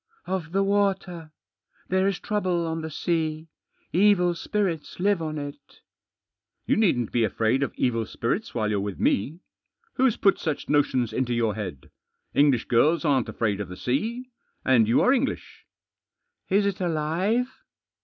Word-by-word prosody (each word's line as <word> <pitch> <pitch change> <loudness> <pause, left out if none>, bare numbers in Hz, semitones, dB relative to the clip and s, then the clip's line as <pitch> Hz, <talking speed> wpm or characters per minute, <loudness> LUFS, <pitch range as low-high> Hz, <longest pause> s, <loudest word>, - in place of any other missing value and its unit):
" - - -42
Of 180 -4 -3
the 195 +2 +2
water. 195 -5 0 0.6
There 190 +1 +2
is 195 -2 -1
trouble 185 -5 -1
on 160 0 -3
the 160 - -5
sea. 160 0 -2 0.4
Evil 180 -2 +4
spirits 175 -2 -3
live 200 -1 +2
on 155 -1 -3
it." 145 0 -9 0.4
" - - -58
You - - +2
needn't 170 - +2
be 120 - +2
afraid 110 +5 +1
of 140 - 0
evil 115 -3 0
spirits 180 - -3
while 110 -2 0
you're 105 - +1
with 100 -1 -4
me. 150 - 0 0.6
Who's 260 -3 +3
put 195 - +3
such 155 -4 -3
notions 135 -5 +1
into 125 -2 0
your 115 -2 +1
head? 95 -11 -7 0.4
English 140 -5 +3
girls 155 +8 +3
aren't 135 -5 +2
afraid 105 -3 -1
of 95 - -6
the 90 - -8
sea. 230 - -2 0.3
And 120 -4 +4
you 115 - +3
are 255 - +4
English." 275 0 -3 0.8
"Is 200 +2 +3
it 195 -1 -2
alive?" 175 +8 0
160 Hz, 160 wpm, -25 LUFS, 125-195 Hz, 0.8 s, Evil